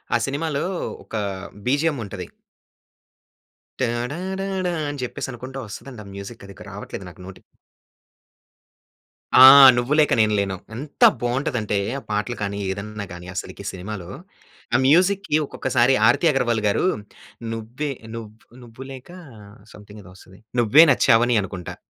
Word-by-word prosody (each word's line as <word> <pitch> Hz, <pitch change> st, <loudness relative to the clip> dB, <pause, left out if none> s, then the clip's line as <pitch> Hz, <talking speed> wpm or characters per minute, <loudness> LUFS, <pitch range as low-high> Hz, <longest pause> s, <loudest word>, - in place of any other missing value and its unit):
ఆ -, -, +5 dB
సినిమాలో 140 Hz, +1 st, -2 dB, 0.4 s
ఒక -, -, -9 dB, 0.5 s
బీజీఎమ్ 145 Hz, +2 st, +1 dB
ఉంటది. 95 Hz, -3 st, -7 dB, 1.5 s
టడడాడా 180 Hz, +10 st, -2 dB, 0.2 s
అని 145 Hz, -1 st, -6 dB
చెప్పేసనుకుంటూ 130 Hz, +1 st, -6 dB
వస్తదండి 115 Hz, +3 st, -10 dB
ఆ -, -, -15 dB
మ్యూజిక్ 100 Hz, +3 st, -9 dB
అది 100 Hz, -, -11 dB, 0.2 s
రావట్లేదు 100 Hz, -1 st, -8 dB
నాకు 90 Hz, -, -15 dB
నోటికి. 95 Hz, 0 st, -12 dB, 1.9 s
ఆ! -, -, +9 dB, 0.3 s
'నువ్వు 120 Hz, +4 st, 0 dB
లేక 150 Hz, -, +3 dB
నేను 110 Hz, -1 st, +2 dB
లేను.' 95 Hz, -1 st, -2 dB, 0.2 s
ఎంత 145 Hz, +5 st, -4 dB, 0.2 s
బాగుంటదంటే, 120 Hz, -4 st, -1 dB, 0.2 s
ఆ -, -, -15 dB
పాటలు 105 Hz, +4 st, -2 dB
కాని, 100 Hz, 0 st, -3 dB
ఏదన్నా 100 Hz, +2 st, -6 dB
గాని 85 Hz, 0 st, -10 dB
అసలికి -, -, -6 dB
సినిమాలో, 95 Hz, -1 st, -7 dB, 0.7 s
ఆ -, -, +6 dB
మ్యూజిక్‌కి 185 Hz, +2 st, +3 dB
ఒక్కొక్కసారి 130 Hz, -1 st, +1 dB
ఆర్తి 140 Hz, +8 st, +3 dB
అగర్వాల్ 120 Hz, -4 st, 0 dB
గారు, 105 Hz, -, +1 dB, 0.7 s
నువ్వే 120 Hz, +6 st, -5 dB, 0.2 s
నువ్ 115 Hz, -2 st, -7 dB, 0.3 s
నువ్వు 120 Hz, +2 st, -11 dB
లేక 130 Hz, +2 st, -11 dB, 0.6 s
సంథింగ్ 105 Hz, 0 st, -13 dB
ఏదో 90 Hz, -, -14 dB
వస్తది, 95 Hz, 0 st, -17 dB, 0.2 s
నువ్వే 130 Hz, +8 st, +7 dB
నచ్చావని 120 Hz, -2 st, +4 dB
అనుకుంటా. 95 Hz, -2 st, -7 dB
120 Hz, 125 wpm, -22 LUFS, 105-140 Hz, 1.9 s, ఆ